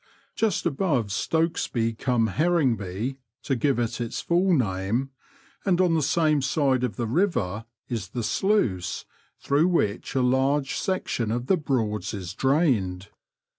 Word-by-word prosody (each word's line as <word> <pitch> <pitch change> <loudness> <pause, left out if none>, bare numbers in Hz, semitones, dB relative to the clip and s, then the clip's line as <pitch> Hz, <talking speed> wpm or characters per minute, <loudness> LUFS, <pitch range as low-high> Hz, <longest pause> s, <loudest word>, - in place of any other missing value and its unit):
Just 220 -4 0
above 140 - 0
Stokesby 120 - 0
cum 115 -1 +1
Herringby 130 - 0
— 115 - -57
to 135 - 0
give 135 +2 +1
it 120 0 -2
its 115 - -3
full 180 +3 +2
name 115 - 0 0.3
— 275 - -31
and 185 -3 +2
on 180 -2 +3
the 160 - +2
same 155 0 +2
side 135 -2 +1
of 115 -6 -1
the 120 - -2
river, 115 - 0 0.2
is 115 -5 -3
the 120 +5 -4
sluice 105 - 0 0.3
through 145 +5 +2
which 120 - 0
a 130 - +2
large 135 +2 +2
section 155 - -1
of 120 +2 -2
the 190 - +3
Broads 115 -9 -1
is 90 -2 -6
drained. 115 - +1
130 Hz, 150 wpm, -25 LUFS, 110-160 Hz, 0.3 s, on